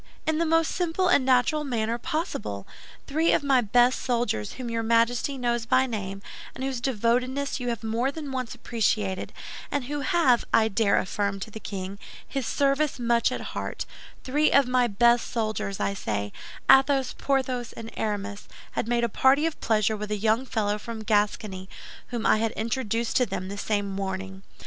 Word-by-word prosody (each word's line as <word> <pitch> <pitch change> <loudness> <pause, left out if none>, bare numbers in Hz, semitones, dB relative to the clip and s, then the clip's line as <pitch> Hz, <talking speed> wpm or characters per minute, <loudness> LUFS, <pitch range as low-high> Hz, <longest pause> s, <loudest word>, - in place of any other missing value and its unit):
In 315 0 +1
the 335 - +1
most 325 0 +3
simple 360 +1 0
and 285 - +5
natural 260 +4 +3
manner 235 -3 -1
possible. 105 - -3 0.4
Three 315 +4 +2
of - - +2
my 270 -3 +4
best 245 +3 +3
soldiers, 235 - -1
whom 255 - -6
your 230 -1 -1
Majesty 230 +4 +2
knows 240 -2 -1
by 260 +2 +4
name, 195 -5 -5 0.3
and 260 - -5
whose 265 -3 -2
devotedness 255 +3 0
you 250 - -4
have 235 -2 -3
more 230 +4 0
than 290 -2 -6
once 255 -2 -3
appreciated, 215 -5 -1 0.4
and 285 -2 -1
who 290 +4 -3
have, 305 -7 +3
I 220 0 +4
dare 205 -1 +2
affirm 200 +1 -1
to 220 - -6
the 220 - -7
king, 195 -1 -6 0.3
his 270 -4 -3
service 280 +3 +1
much 235 -1 +2
at - - -3
heart—three 295 +4 -2
of 280 -2 +5
my 250 -1 +3
best 235 +3 +3
soldiers, 215 -4 -2
I 200 - 0
say, 105 - -3 0.3
Athos, 270 -1 +5
Porthos, 260 -3 -1
and 225 0 -8
Aramis, 205 -1 -3 0.2
had - - -2
made 240 0 +1
a - - +3
party 265 +6 +3
of 330 - -3
pleasure 220 -1 +2
with 210 0 -5
a 210 - -1
young 220 +5 +1
fellow 210 -2 0
from 225 0 -6
Gascony, 205 -3 0 0.4
whom 240 -2 -4
I - - +5
had 225 0 0
introduced 230 0 -1
to 250 - +3
them 190 -1 -4
the 200 - -5
same 205 -1 0
morning. 190 -1 -4
235 Hz, 180 wpm, -26 LUFS, 210-265 Hz, 0.4 s, and